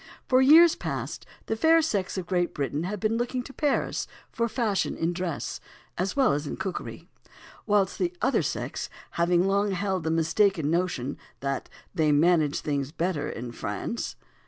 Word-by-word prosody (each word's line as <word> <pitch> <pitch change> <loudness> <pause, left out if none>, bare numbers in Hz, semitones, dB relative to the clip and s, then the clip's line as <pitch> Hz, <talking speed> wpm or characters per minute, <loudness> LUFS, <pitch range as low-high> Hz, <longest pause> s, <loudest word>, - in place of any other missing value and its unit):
For 255 0 +5
years 320 +5 +8
past - - -5 0.2
the 220 - -1
fair 320 +8 +5
sex 200 -11 -1
of 185 - -3
Great 175 -1 0
Britain 145 +3 -2
have 205 +2 -3
been 220 +3 +1
looking 245 +1 -2
to 270 - -11
Paris 290 -1 0 0.2
for 235 0 -1
fashion 220 -4 0
in 165 +2 0
dress, 145 -8 -3 0.4
as 185 +2 -2
well 270 -3 +4
as 145 +1 -2
in - - -4
cookery; 190 - -5 0.6
whilst 205 -3 +2
the 355 -1 +1
other - - +2
sex - - -3 0.2
have 170 0 0
long 195 +3 +3
held 190 -1 -1
the 160 - -1
mistaken 165 0 +2
notion 165 -7 -1 0.2
that 140 -1 -2 0.2
"they 155 -2 +2
manage 155 -1 +3
things 140 -2 -2
better 170 -2 -1
in 120 +1 -6
France." 110 - -4
180 Hz, 165 wpm, -27 LUFS, 155-215 Hz, 0.6 s, years